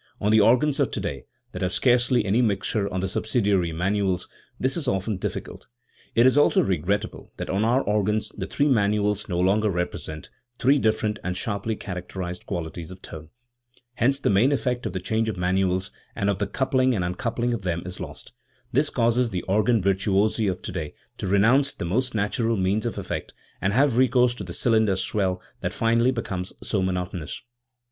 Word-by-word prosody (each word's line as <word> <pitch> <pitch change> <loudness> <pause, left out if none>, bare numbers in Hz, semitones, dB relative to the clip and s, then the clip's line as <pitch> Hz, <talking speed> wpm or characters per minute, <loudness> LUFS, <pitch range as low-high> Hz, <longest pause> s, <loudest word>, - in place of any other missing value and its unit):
On 105 - +1
the 110 - +6
organs 125 +7 +3
of - - +2
today, - - -4 0.3
that 90 - -7
have 90 0 -1
scarcely 125 0 +3
any 105 +5 +2
mixtures 100 -1 0
on 95 - -2
the 95 - -1
subsidiary 100 -4 +1
manuals, 95 +2 0 0.3
this 130 +1 0
is 160 -5 -1
often 100 -2 0
dif - - -3
ficult. - - -8 0.5
It 115 - +5
is 130 +2 +5
also 145 - +4
regrettable 95 +4 -2
that - - -4
on 100 +3 +1
our 125 +4 +3
organs 105 +1 0
the 95 -1 -4
three 145 +8 +1
manuals 105 -4 +1
no 90 -1 -1
longer 105 +4 +3
represent, 85 -4 -4 0.3
three 135 +4 +4
different 110 -2 0
and 90 0 -2
sharply 110 0 -2
characterised 90 -2 -6
qualities 85 -2 -5
of 95 0 -11
tone. 80 0 -9 0.6
Hence 130 +3 +2
the - - 0
main 110 +8 +4
effect 125 -3 -1
of 95 - -6
the 95 - -2
change 110 +4 0
of 105 - -4
manuals 95 +1 0 0.2
and 100 -2 +1
of 95 - -3
the 105 - 0
coupling 130 +3 +1
and 90 -4 0
uncoupling 115 +7 -1
of 115 - -3
them 85 -3 -2
is 90 0 -7
lost. - - -8 0.4
This 145 +4 +2
causes 120 0 +2
the 90 -5 -3
organ 105 +2 +2
virtuosi 100 +3 +2
of 95 -2 -2
today 75 -2 -5 0.2
to - - -3
renounce 120 +9 +3
the - - -4
most 120 +8 -1
natural 115 +2 0
means 100 +5 +1
of 115 - -4
effect - - -5 0.3
and 95 - +1
have 130 +2 +3
recourse 125 -1 +4
to 115 - -7
the 90 - -7
cylinder 110 -2 +2
swell, 95 -1 -1 0.2
that - - -3
finally 115 +2 +2
becomes 100 -7 -3
so 100 - 0
monotonous. 90 - -3
105 Hz, 185 wpm, -25 LUFS, 95-120 Hz, 0.6 s, the